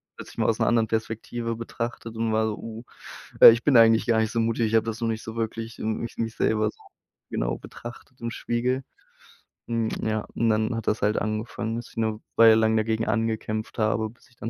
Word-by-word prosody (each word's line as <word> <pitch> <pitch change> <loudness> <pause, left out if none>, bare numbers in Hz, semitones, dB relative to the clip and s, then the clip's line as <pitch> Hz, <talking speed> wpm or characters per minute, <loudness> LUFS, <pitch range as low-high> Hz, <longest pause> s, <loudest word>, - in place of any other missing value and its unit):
plötzlich - - -11
mal - - +1
aus - - 0
'ner - - +2
anderen 115 -2 +3
Perspektive 115 +1 -3
betrachtet 115 0 -5
und 115 0 -1
war 110 0 +2
so: 105 - -3
„Uh, 115 +1 -8 0.6
äh, - - +13
ich 115 +1 +1
bin 140 -4 +4
eigentlich 115 0 +6
gar 115 -2 +3
nicht 110 -1 +1
so 115 - 0
mutig. 115 0 +1
Ich 110 - -2
habe 110 0 +3
das 115 0 -4
noch 115 - 0
nicht 110 0 -2
so 110 +1 -8
wirklich 115 0 -4
m 110 0 -2
mich 115 - -6
mich 115 0 -2
selber 110 -1 +1
so - - -28 0.5
genau - - -2
betrachtet 120 +1 -11
im 115 0 -3
Spiegel.“ 125 +3 -1 0.9
Hm, 115 -1 0
ja, 110 -1 -1
und 115 - +1
dann 110 +2 +1
hat 115 - -5
das 105 - +1
halt 105 +1 +1
angefangen, 110 +1 -3
dass 120 - -7
ich - - -21
'ne 110 -1 -1 0.2
Weile 115 -1 +7
lang 110 0 +3
dagegen 110 +1 0
angekämpft 110 -1 -2
habe, 110 0 +1
bis 125 +2 -21
ich 125 - -27
dann 115 - -5
115 Hz, 225 wpm, -25 LUFS, 110-115 Hz, 0.9 s, äh